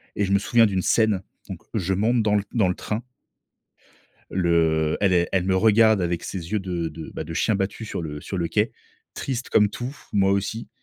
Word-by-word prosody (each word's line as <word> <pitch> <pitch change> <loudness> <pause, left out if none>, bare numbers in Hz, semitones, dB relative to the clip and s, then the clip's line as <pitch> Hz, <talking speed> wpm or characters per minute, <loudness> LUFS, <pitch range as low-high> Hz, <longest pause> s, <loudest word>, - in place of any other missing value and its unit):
et 100 - 0
je 95 - -3
me 100 - +4
souviens 115 +2 +4
d'une 95 -3 0
scène, 110 -3 +2 0.3
donc - - -6
je 95 -3 0
monte 110 +4 +2
dans 105 -1 +2
le 100 - +1
dans 105 -6 +2
le 90 - -1
train 110 +2 -4 1.3
le 80 -3 +2
elle 100 -2 +3
est 85 0 +2
elle 90 -2 +1
me 95 0 +1
regarde 110 0 +5
avec 85 -1 -1
ses 90 -1 -6
yeux 105 - +2
de 90 -3 -3
de, 80 +1 -9
bah, - - -4
de 80 - -7
chien 110 - +1
battu 100 +3 -2
sur 95 - -4
le 75 -2 -6
sur 95 - -6
le 85 -1 -1
quai. 105 +6 +1 0.4
Triste 130 -2 -4
comme 105 -1 +4
tout, 125 +4 -6 0.2
moi 95 -1 +3
aussi 100 +3 -2
95 Hz, 215 wpm, -24 LUFS, 85-110 Hz, 1.3 s, regarde